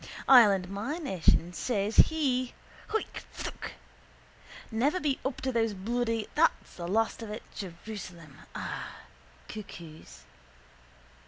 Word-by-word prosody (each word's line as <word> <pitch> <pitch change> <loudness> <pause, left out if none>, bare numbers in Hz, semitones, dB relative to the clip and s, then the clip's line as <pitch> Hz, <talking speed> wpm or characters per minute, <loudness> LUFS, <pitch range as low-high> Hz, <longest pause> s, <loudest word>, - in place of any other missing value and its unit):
Ireland 205 -8 +7
my 205 - -3
nation 185 - +2
says 210 +1 -1
he 260 -6 +4 0.3
(hoik! 440 - -2
phthook!) - - -6 1.0
never 275 +11 +2
be 290 -5 0
up 265 -1 -2
to 260 - 0
those 225 -3 +1
bloody 230 +2 -1
(there's 330 +2 +6 0.3
the 170 -1 -5
last 225 +5 +1
of 225 - -6
it) 210 +2 -5
Jerusalem 175 -5 -8 0.2
ah! - - -5 0.5
cuckoos. 170 -7 -9
220 Hz, 110 wpm, -30 LUFS, 190-255 Hz, 1.0 s, Ireland